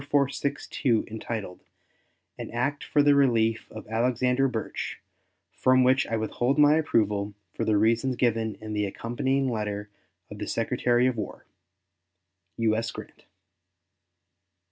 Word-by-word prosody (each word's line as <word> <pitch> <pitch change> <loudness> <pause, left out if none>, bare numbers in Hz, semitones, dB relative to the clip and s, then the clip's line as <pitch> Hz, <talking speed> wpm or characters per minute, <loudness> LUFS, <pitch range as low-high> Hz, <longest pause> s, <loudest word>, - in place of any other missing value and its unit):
4462, 140 -3 0
entitled 110 -4 -5 0.7
"An - - -7
act 130 +5 -2
for 145 - +2
the 145 0 +5
relief 115 -5 +2
of 110 - -9
Alexander 125 +3 +1
Burtch," 115 -4 -4 0.5
from 130 0 +3
which 130 +1 +3
I 115 - -1
withhold 120 +5 0
my 150 0 +6
approval 105 -8 0 0.2
for - - -2
the 110 -1 +3
reasons 115 +4 +2
given 115 -3 0
in 110 0 -7
the 105 -1 0
accompanying 130 +6 -1
letter 105 -2 -3 0.4
of - - -8
the - - -4
Secretary 120 0 +1
of 130 -2 +1
War. 105 - -6 1.1
U.S. 115 0 +1
GRANT. - - -11
115 Hz, 125 wpm, -27 LUFS, 110-130 Hz, 1.1 s, my